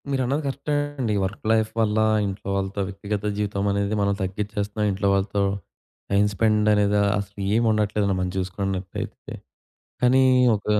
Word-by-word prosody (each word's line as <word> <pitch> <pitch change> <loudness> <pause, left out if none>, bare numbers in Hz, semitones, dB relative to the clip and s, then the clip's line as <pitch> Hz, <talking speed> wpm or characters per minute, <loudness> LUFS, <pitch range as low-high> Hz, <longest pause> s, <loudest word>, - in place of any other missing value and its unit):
మీరన్నది 135 +2 0
కరెక్టే 140 +2 -2 0.2
అండి. 115 -5 0
వర్క్ 95 +3 -4
లైఫ్ 110 -1 +2
వల్ల 110 -1 +2 0.3
ఇంట్లో 100 0 -6
వాళ్ళతో 100 +1 -2
వ్యక్తిగత 100 +1 -4
జీవితం 100 -1 -1
అనేది 100 +1 0
మనం 100 0 +2
తగ్గిచ్చేస్తన్నాం. 105 +2 -2
ఇంట్లో 100 +1 -1
వాళ్ళతో 100 +1 0 0.7
టైమ్ 100 +1 +4
స్పెండ్ 105 0 +2
అనేదా 105 0 +3 0.2
అసలు 100 0 -6
ఏం 115 - +3
ఉండట్లేదండి 105 -2 +1
మనం 90 0 -1
జూసుకున్న‌ట్టయితే. 95 0 -4 0.7
కానీ 125 +1 +5 0.3
ఒక, 105 - -7
105 Hz, 140 wpm, -24 LUFS, 100-110 Hz, 0.7 s, కానీ